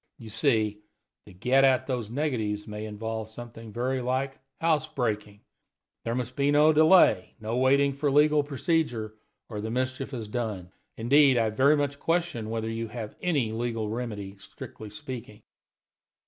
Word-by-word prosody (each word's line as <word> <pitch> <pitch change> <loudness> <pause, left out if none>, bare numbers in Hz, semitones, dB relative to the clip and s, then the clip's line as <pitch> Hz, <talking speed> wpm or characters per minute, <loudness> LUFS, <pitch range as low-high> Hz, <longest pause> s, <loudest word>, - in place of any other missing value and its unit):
You 115 - -10
see, 110 -4 +1 0.5
to - - -12
get 125 +9 +2
at 130 -1 +4
those 125 -5 -3
negatives 115 -7 -2
may 105 0 -5
involve 110 +1 -5
something 115 -1 -10
very 125 +3 -1
like 130 +2 -2 0.2
house 160 -2 +2
breaking. 105 -8 -3 0.6
There 115 0 -1
must 125 0 -3
be 140 0 +2
no 150 +2 +5
delay, 155 - +5
no 110 +2 -3
waiting 140 +2 +3
for 140 +1 0
legal 150 +1 +4
procedure, 140 - -1 0.3
or 105 -3 -5
the 110 - -4
mischief 130 +3 -2
is 115 -5 -5
done. 105 -6 -4 0.3
Indeed, 135 +3 +5
I 110 -2 +2
very 140 +7 +4
much 140 -1 -1
question 165 -10 -1
whether 110 0 -2
you 115 0 -3
have 110 -2 -7
any 145 -11 +1
legal 115 -1 -2
remedy, 105 -4 -5
strictly 110 +2 -10
speaking." 110 -1 -8
120 Hz, 155 wpm, -27 LUFS, 110-140 Hz, 0.6 s, no